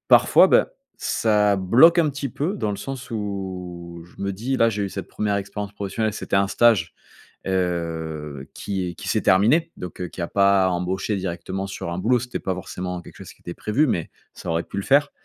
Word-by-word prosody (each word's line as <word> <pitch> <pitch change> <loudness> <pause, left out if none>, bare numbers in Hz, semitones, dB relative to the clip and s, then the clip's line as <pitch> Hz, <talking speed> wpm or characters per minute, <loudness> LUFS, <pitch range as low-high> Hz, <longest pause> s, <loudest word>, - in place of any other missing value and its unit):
parfois, - - +7
ben, - - +5 0.3
ça 105 -2 +2
bloque 130 - +6
un 160 - +4
petit 140 0 -4
peu 160 - -2
dans 105 - -1
le 100 - -4
sens 130 +2 -6
où 90 -5 -5
je 90 - -11
me 100 0 -1
dis: 125 +7 -2
«Là, 115 0 +4
j'ai 100 -1 -2
eu - - -2
cette 95 -2 -6
1re 105 -1 -1
expérience 100 0 -5
professionnelle. 105 +2 -2
C'était 95 - -1
un 100 0 +3
stage, 110 -9 +3 0.5
heu, 80 -6 -2
qui 95 -3 -3
est 85 - -6
qui - - -9
s'est - - +1
terminé, 140 - +4
donc, 90 0 -7
heu, 90 - -2
qui - - -12
a 85 - -1
pas 100 -1 +4
embauché 90 +3 -1
directement 95 +1 -4
sur 90 -3 -5
un 85 - -3
boulot. 125 +5 +3
C'était 125 +1 -5
pas 95 - -2
forcément 90 0 -5
quelque - - -14
chose - - -10
qui - - -30
était 85 - -6
prévu, 135 +8 +1
mais 85 -8 -1 0.2
ça 90 - -8
aurait 85 +1 0
pu - - -10
le 100 - -1
faire 145 +4 +3
100 Hz, 215 wpm, -23 LUFS, 90-110 Hz, 0.5 s, parfois